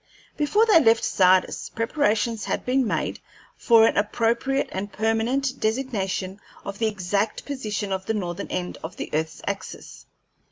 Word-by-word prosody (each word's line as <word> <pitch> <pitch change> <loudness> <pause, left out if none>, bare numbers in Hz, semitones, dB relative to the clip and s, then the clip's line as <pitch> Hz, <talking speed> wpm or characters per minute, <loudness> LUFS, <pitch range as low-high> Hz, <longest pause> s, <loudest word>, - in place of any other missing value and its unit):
Before 410 +10 +3
they 425 -7 +6
left 225 -6 +4
Sardis, 185 0 +2
preparations 230 -2 0
had - - -2
been 255 -1 +2
made - - -2 0.4
for 230 -2 +5
an - - +1
appropriate 235 +6 +1
and 200 +2 -4
permanent 235 +6 0
designation 210 -5 -2 0.3
of 200 0 -6
the 225 - +2
exact 205 +1 -1
position 215 -7 -3
of 190 0 -3
the 220 - 0
northern 175 -4 -4
end 180 -1 -4
of 160 - -6
the - - -6
earth's 160 +1 -2
axis. 195 -1 -6
220 Hz, 150 wpm, -24 LUFS, 195-250 Hz, 0.4 s, they